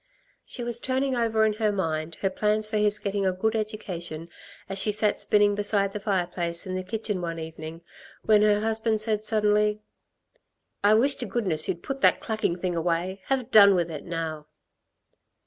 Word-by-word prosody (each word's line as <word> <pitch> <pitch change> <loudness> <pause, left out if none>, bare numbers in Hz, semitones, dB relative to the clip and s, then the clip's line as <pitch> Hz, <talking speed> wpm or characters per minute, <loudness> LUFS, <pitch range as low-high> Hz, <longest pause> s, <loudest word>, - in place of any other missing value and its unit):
She 245 - -7
was 235 0 0
turning 260 +1 -1
over 225 -2 +2
in 215 - +1
her 215 -1 +3
mind 160 -4 -3
her 195 - 0
plans 210 +2 0
for 215 - -2
his 210 0 +2
getting 200 0 -2
a 190 - +2
good 220 +5 -1
education, 180 -7 -5 0.4
as 195 0 -2
she 210 - +3
sat 210 0 +1
spinning 205 -1 +3
beside 205 -1 +1
the 210 - -4
fireplace 175 -4 -2
in 185 - -5
the 185 - -2
kitchen 210 0 -3
one 165 -1 -4
evening, 160 0 -8 0.4
when 215 -1 +5
her 210 -1 +3
husband 220 0 0
said 215 -1 0
suddenly: 210 -1 +2 1.0
"I 210 +1 +5
wish 270 +6 +5
to - - -2
goodness 180 -10 0
you'd 175 -3 -3
put 275 0 -5
that - - +4
clacking 220 -6 -2
thing 180 -1 -3
away 175 +3 -2
have 260 -2 -2
done 200 -2 +7
with 170 -2 -1
it 150 - -7
now!" 160 -3 -5
205 Hz, 180 wpm, -26 LUFS, 175-215 Hz, 1.0 s, done